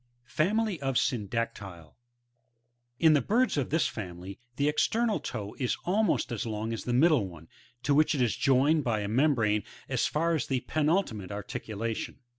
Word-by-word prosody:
FAMILY 200 - 0
OF 135 -2 0
SYNDACTYL.E. 110 -5 -2
9. - - -16 1.1
In 160 -1 +6
the 145 - +4
birds 235 - +2
of 140 -4 -1
this 160 +3 +2
family, 95 -2 -6 0.2
the 140 +2 +1
external 220 +8 +1
toe 105 -3 -6
is 125 -3 0
almost 205 - +1
as 115 - -2
k>ng 110 0 -3
as 115 - -5
the 125 - -1
middle 135 - +4
one, 85 -3 -12 0.4
to 145 - +2
which 155 +1 +3
it 135 - 0
is 120 - 0
joined 140 +3 +3
by 110 -4 0
a 100 - -3
membrane 115 -3 +2 0.3
as - - 0
far 165 +2 0
as 155 -5 -1
the 130 -2 0
penultimate 150 - 0
articulation. 105 +2 -4
125 Hz, 170 wpm, -29 LUFS, 105-155 Hz, 1.1 s, In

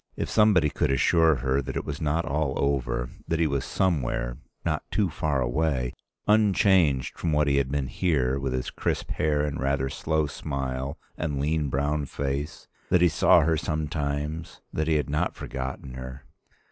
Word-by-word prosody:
If - - -3
somebody 100 -9 +4
could - - 0
assure 80 +4 +4
her 65 +1 +2
that 65 -1 -6
it - - -2
was 75 +1 -5
not 80 +2 0
all 75 -1 -1
over, 65 -3 0 0.2
that 80 - 0
he 80 - +2
was 70 -3 0
somewhere, 65 -9 -1 0.3
not 80 -2 0
too 100 -6 +1
far 75 -3 0
away, 65 -1 0 0.3
unchanged 95 -9 +3
from 85 - 0
what 75 0 +3
he 70 -1 +3
had 70 -2 +1
been 70 -1 -1
here, 70 -4 0
with 70 -1 -2
his 65 0 -2
crisp - - -2
hair 75 -1 +1
and 75 0 -3
rather 70 0 0
slow 80 +3 0
smile 70 0 -4 0.2
and 75 -4 -2
lean 75 0 0
brown 70 +2 0
face, 70 +2 -4 0.2
that 90 - +4
he 90 - +6
saw 80 +2 +5
her 80 +1 +2
sometimes, 75 0 -3
that 80 0 -1
he 80 - +3
had 75 - 0
not 75 +4 0
forgotten 65 0 -5
her. 65 +1 -8
75 Hz, 175 wpm, -26 LUFS, 65-80 Hz, 0.3 s, he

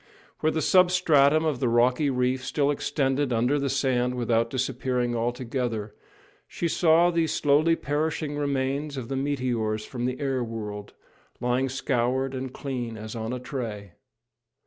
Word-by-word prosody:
Where 155 - +2
the 160 0 -1
substratum 160 -5 +4
of 150 -5 0
the 125 - +1
rocky 125 +5 +3
reef 125 0 0
still 140 +1 +1
extended 140 -2 0
under 120 +5 +2
the 140 0 -1
sand 125 -2 +1
without 115 -1 +1
disappearing 125 -1 -1
altogether, 120 -2 -2 0.5
she 170 - -2
saw 170 +1 +4
these 165 -2 +1
slowly 150 +3 +3
perishing 150 0 -2
remains 140 0 -1
of 120 -3 -5
the 135 - -2
meteors 125 -6 -1
from 120 -2 -4
the 125 0 -2
air 135 -3 -1
world, 105 -3 -6 0.5
lying 125 +2 0
scoured 130 0 0
and 130 -1 -4
clean 125 -5 -5
as 110 +2 -7
on 110 0 -4
a 125 - -3
tray. 115 -7 -5
130 Hz, 145 wpm, -26 LUFS, 120-145 Hz, 0.5 s, substratum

